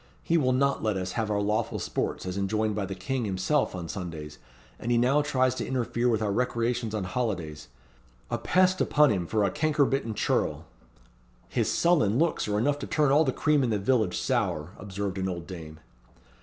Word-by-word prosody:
He 165 - +1
will 135 -6 +3
not 140 +2 +1
let 105 -3 0
us 95 0 -3
have 110 +1 -2
our 105 -1 +1
lawful 105 +2 0
sports - - -3
as 90 0 -4
enjoined 105 +2 0
by 100 -2 -2
the 95 - -5
King 120 +7 -2
himself 95 +7 0
on 85 -2 -5
Sundays, 80 -5 -6 0.4
and 120 - -3
he 120 - +4
now 130 +5 +3
tries 130 -3 +1
to - - -4
interfere 125 -1 0
with 110 -2 +1
our 105 - 0
recreations 115 0 -1
on 105 - -2
holidays. 90 -7 -3 0.6
A - - -1
pest 185 +1 +3
upon 150 -3 +4
him 90 -5 -1
for 110 +2 +1
a 100 - +1
cankerbitten 140 -5 +1
churl!" - - 0 0.8
"His - - 0
sullen 150 - +3
looks 165 -4 +1
are 105 0 0
enough 140 +6 +1
to - - -5
turn 150 -3 +2
all 150 +3 +5
the 130 - +1
cream 150 +2 +2
in 125 - +1
the 110 - +1
village 105 -2 +1
sour," 90 - -1
observed 100 -1 -4
an 95 0 -1
old 85 -2 -5
dame. 80 -4 -9
110 Hz, 195 wpm, -27 LUFS, 95-130 Hz, 0.8 s, all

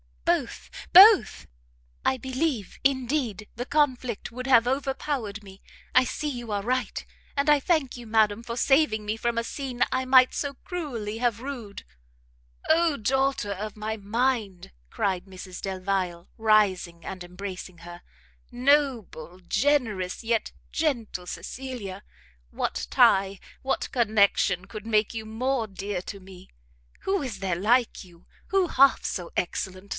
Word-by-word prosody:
"Both, - - -1 0.2
both! - - +8 0.6
I 265 - +2
believe, 260 - -3
indeed, 255 -6 0
the 245 - -3
conflict 255 -7 0
would 255 +2 -6
have 240 -3 +6
overpowered 265 -5 -2
me, 195 -1 -14 0.3
I 255 0 +5
see 300 +4 -3
you 240 -5 -6
are 200 -1 -1
right, 255 +2 -2 0.3
and 280 +1 +2
I 295 -1 +6
thank 280 -4 0
you, 240 -1 -10
madam, 215 -1 +2
for 235 0 -6
saving 250 -6 +3
me 210 +1 -1
from 235 +1 -1
a 230 - +1
scene 255 0 -2
I 260 0 0
might 255 0 +6
so 285 -1 -3
cruelly 250 - -4
have 235 -2 0
rued." 245 -7 -7 0.8
"Oh 325 -2 +3
Daughter 265 -1 0
of 205 +2 -5
my 215 +1 -4
mind!" 215 -2 -1 0.2
cried 185 - -1
Mrs 185 -1 -9
Delvile, 185 -2 -2
rising 205 -6 +2
and 185 -2 -6
embracing 180 -1 -8
her, 175 +1 -11 0.5
"noble, 245 - 0
generous, 225 -7 0
yet 225 -1 -1 0.2
gentle 235 - -2
Cecilia! 235 -8 -6 0.5
what - - -3
tie, 195 0 +4 0.2
what 270 - -2
connection, 200 -5 +2
could 215 +1 -9
make 215 -1 +2
you 220 -1 -5
more 235 +2 -1
dear 195 -1 -4
to 200 - -7
me? 185 -1 -14 0.5
Who 385 0 0
is 240 -8 -5
there 190 -2 -1
like 235 +6 +2
you? 170 -1 -19 0.2
Who 385 -2 +2
half 275 -3 +4
so 175 -2 -4
excellent? 185 +2 -3
225 Hz, 140 wpm, -26 LUFS, 195-260 Hz, 0.8 s, both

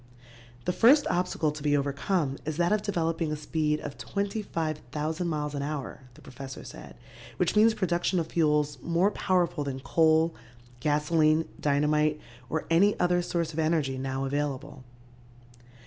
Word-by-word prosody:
The 180 - 0
first 265 - +6
obstacle 175 -3 0
to 150 0 -8
be 145 0 +2
overcome 140 +1 -1
is 155 0 -4
that 175 +1 +2
of 210 -1 +2
developing 165 -5 -1
a - - -1
speed 150 0 -1
of 145 - -7
25,000 160 - -3
miles 150 -2 -2
an 140 - -3
hour, 140 -2 -5
the - - -17
professor 135 +1 -9
said, - - -11 0.4
which 180 +2 +1
means 220 +1 +5
production 175 -1 0
of 165 - -1
fuels 150 -3 +1
more 170 +4 +2
powerful 180 -7 0
than 135 -2 -4
coal, 160 +4 +3 0.5
gasoline, 155 +2 +2
dynamite 150 +1 +2 0.3
or 160 +4 -2
any 200 +5 +4
other 175 0 +2
source 170 -2 -2
of 155 - -4
energy 155 -5 0
now 135 0 -2
available. 145 -1 -3
155 Hz, 150 wpm, -28 LUFS, 145-175 Hz, 0.5 s, first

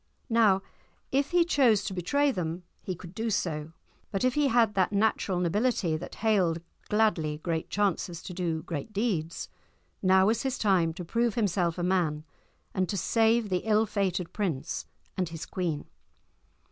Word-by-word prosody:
Now, 210 -4 +4 0.5
if 275 +2 +1
he 350 -1 +4
chose 255 - +4
to 195 - -3
betray 280 - +1
them 175 -4 -3 0.2
he 185 - -4
could 175 +1 -11
do 225 +2 -2
so; 160 -6 -2 0.4
but 195 - -2
if 255 -1 +3
he 295 0 +3
had 230 -4 +3
that 190 -1 +2
natural 200 -3 +1
nobility 180 -1 +1
that 165 +3 -6
hailed 185 -7 +3 0.3
gladly 210 -9 +2
great 160 0 -3
chances 185 -4 -1
to 180 - -7
do 170 -3 -2
great 165 +7 -5
deeds, 195 -7 -1 0.5
now 190 0 +5
was 225 +2 +2
his 265 -1 -1
time 185 -6 +3
to 180 - -6
prove 230 +4 0
himself 180 -6 +1
a 175 - -2
man, 175 -5 +1 0.5
and 185 -2 0
to 200 - -1
save 225 +3 +2
the 180 -1 +1
ill 215 +1 +2
fated 190 -4 -1
prince 180 -11 -2 0.3
and 185 -3 -1
his 165 -1 -6
queen. 165 -5 -3
190 Hz, 165 wpm, -28 LUFS, 170-220 Hz, 0.5 s, now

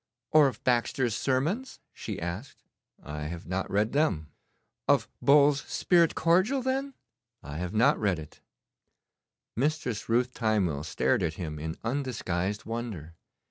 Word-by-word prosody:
'Or 155 -2 +7
of 135 - -5
Baxter's 120 -1 +1
Sermons?' 160 - -1
she - - -6
asked. 85 +10 -6 0.4
'I 75 0 -6
have 85 +2 -6
not 95 +2 -2
read 105 +3 +1
them.' 90 - +1 0.6
'Of - - +3
Bull's 145 0 +5
"Spirit 170 -3 +3
Cordial," 185 +11 +3
then?' 270 +1 -1 0.5
'I 70 +1 -7
have 90 +2 -4
not 125 +7 +4
read 100 -5 +1
it.' 75 -1 -11 1.1
Mistress 130 -5 -1
Ruth 125 +2 +2
Timewell 100 - 0
stared 80 - +1
at 80 0 -1
him 75 -4 -5
in 80 +2 -5
undisguised 110 -7 -2
wonder. 110 -9 -5
115 Hz, 135 wpm, -28 LUFS, 85-145 Hz, 1.1 s, Or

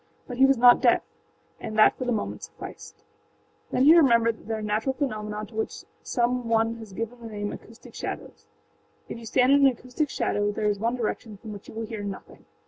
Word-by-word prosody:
But 245 - -7
he 265 +1 +6
was 270 -1 +3
not 245 +1 +7
deaf, - - +4 0.6
and 220 -1 -6
that 215 - +6
for 255 - -5
the 245 - 0
moment 215 -3 -3
sufficed. - - -11 0.7
Then 255 - +1
he 310 +4 +8
remembered 235 -7 +5
that - - -17
there 225 -1 -2
are - - -6
natural 215 +5 0
phenomena 215 -6 -3
to 220 - -18
which 220 0 -4 0.2
some 245 0 -1
one 225 0 +1
has 220 -3 -11
given 230 +5 -5
the 230 - -7
name 205 -1 -4
âacoustic 225 +1 -12
shadows.â - - -7 0.6
If - - -6
you 230 - -9
stand 255 +3 +3
in 280 0 +6
an - - +4
acoustic 255 +4 -3
shadow 205 -4 0
there 210 +1 -3
is 205 -1 +1
one 230 +3 0
direction 225 -2 -4
from 215 +1 -9
which 205 - -11
you - - -11
will 225 0 -3
hear 215 -1 -6
nothing. 200 -1 -8
230 Hz, 220 wpm, -26 LUFS, 215-250 Hz, 0.7 s, he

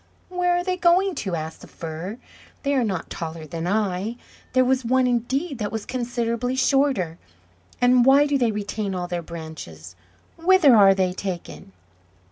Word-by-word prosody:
"Where 355 -1 +1
are 355 - -1
they 365 0 -1
going 365 +2 +3
to?" 190 -4 -2
asked 160 0 -6
the - - -12
Fir. 165 +6 -7 0.5
"They 280 0 +1
are 260 -3 +2
not 190 -7 -3
taller 160 -1 -6
than 165 +2 -5
I; 205 +2 -1 0.4
there 255 0 +4
was 260 0 +1
one 255 +2 +2
indeed 260 +4 -1
that 205 -2 -2
was 220 -1 -4
considerably 240 0 -2
shorter; 260 - +1 0.6
and 245 0 +5
why 275 +3 +6
do 290 -1 0
they 240 -3 +2
retain 205 -1 -3
all 180 -1 -3
their 175 -1 -3
branches? 155 - -9 0.4
Whither 335 -6 +5
are 195 -2 +7
they 185 -1 +1
taken?" 175 - -6
225 Hz, 165 wpm, -23 LUFS, 175-265 Hz, 0.6 s, are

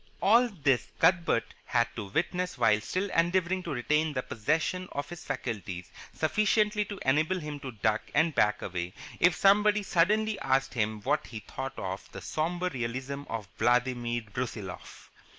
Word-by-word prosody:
All 235 +4 +5
this 140 - +1
Cuthbert 170 -10 +2
had 120 -1 +2
to 110 - -4
witness 180 - -1
while 105 0 +4
still 185 - -2
endeavouring 180 +2 +2
to 175 - -7
retain 150 +4 +1
the 130 -2 -2
possession 160 +10 -1
of 145 - -3
his 175 -2 -8
faculties 95 -7 -4 0.2
sufficiently 210 +4 +2
to 205 0 -7
enable 155 +7 +2
him 150 -2 -6
to 135 -2 -6
duck 110 -1 0
and 160 +2 +3
back 105 -4 +2
away 90 -1 -4 0.2
if 175 -1 +5
somebody 210 +2 +4
suddenly 210 +4 +2
asked 135 0 +1
him 110 -2 -1
what 145 +6 0
he 110 -2 -7
thought 135 +5 -6
of 95 0 -5
the - - -7
sombre 175 +3 -1
realism 130 +3 -4
of 110 -3 -4
Vladimir 120 0 +1
Brusiloff. 105 -8 -6
145 Hz, 155 wpm, -29 LUFS, 115-180 Hz, 0.2 s, All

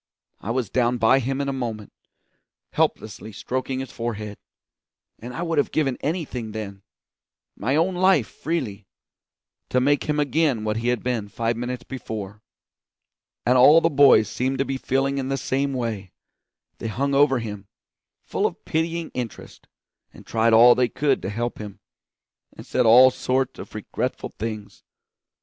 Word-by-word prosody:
I 105 - -7
was 120 -4 -1
down 125 -1 +1
by 120 +4 +4
him 135 +2 -2
in 140 - -2
a 140 - -1
moment, 115 -5 -5 0.8
helplessly 110 0 -2
stroking 130 +5 -3
his 135 - -7
forehead; 110 -3 -5 0.8
and 120 +2 -8
I 130 +7 -4
would 165 -3 0
have - - +1
given 135 -5 0
anything 140 - -3
then 100 -3 -6 0.7
my 130 +7 -1
own 170 +4 +2
life 185 - +3
freely 115 - -4 0.8
to 125 - +2
make 140 +2 +2
him 150 0 0
again 145 -5 +1
what 105 0 -1
he 115 +1 -2
had 125 -1 0
been 120 -5 -2
five 115 +3 -2
minutes 120 +1 -4
before. 105 -6 -7 1.0
And 125 +1 +4
all 145 +6 +8
the 165 0 +1
boys 140 -7 +6
seemed 130 +5 -2
to 135 - 0
be 135 - -3
feeling 135 +1 0
in 130 0 -3
the 135 - 0
same 135 +2 -1
way; 115 -7 -4 0.7
they - - -4
hung 140 +6 -1
over 140 -1 +4
him, 105 -4 -6 0.6
full - - 0
of - - -10
pitying 165 +1 -2
interest, 120 -3 -7 0.4
and - - -15
tried 115 0 +2
all 120 +2 +8
they 125 -1 +1
could 145 +2 0
to 95 - -4
help 120 +3 -3
him, 105 -2 -8 0.8
and - - -10
said 125 -2 +1
all 125 +3 +8
sorts 130 0 -1
of - - -10
regretful - - -4
things. 110 -1 -7
125 Hz, 165 wpm, -23 LUFS, 110-135 Hz, 1.0 s, all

